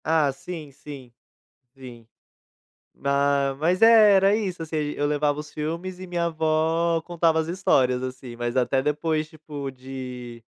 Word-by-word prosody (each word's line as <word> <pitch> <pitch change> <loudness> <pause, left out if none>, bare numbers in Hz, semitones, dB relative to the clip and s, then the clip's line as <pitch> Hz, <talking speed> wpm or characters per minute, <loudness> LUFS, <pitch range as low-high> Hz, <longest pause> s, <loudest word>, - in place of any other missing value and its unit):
Ah 155 -3 +2
sim, 155 +1 -8
sim, 135 -3 -11 0.7
sim. 120 -4 -12 1.0
Ah, 140 0 +1
mas 175 +5 +1
é, 225 -2 +8
era 195 +2 +4
isso, 190 -6 -3
assim, 160 0 -6
a - - +1
gen 145 - -3
eu 145 - 0
levava 145 0 0
os 150 0 -8
filmes 170 +4 -4
e 185 - -8
minha 175 -1 -1
avó 160 +1 +1
contava 165 -1 +1
as 160 - -1
histórias, 130 -8 +2
assim, 130 -1 -7
mas 120 +1 -3
até 130 +1 +2
depois, 155 +2 -1
tipo, 150 -3 -7
de 125 -2 -8
150 Hz, 160 wpm, -24 LUFS, 135-165 Hz, 1.0 s, é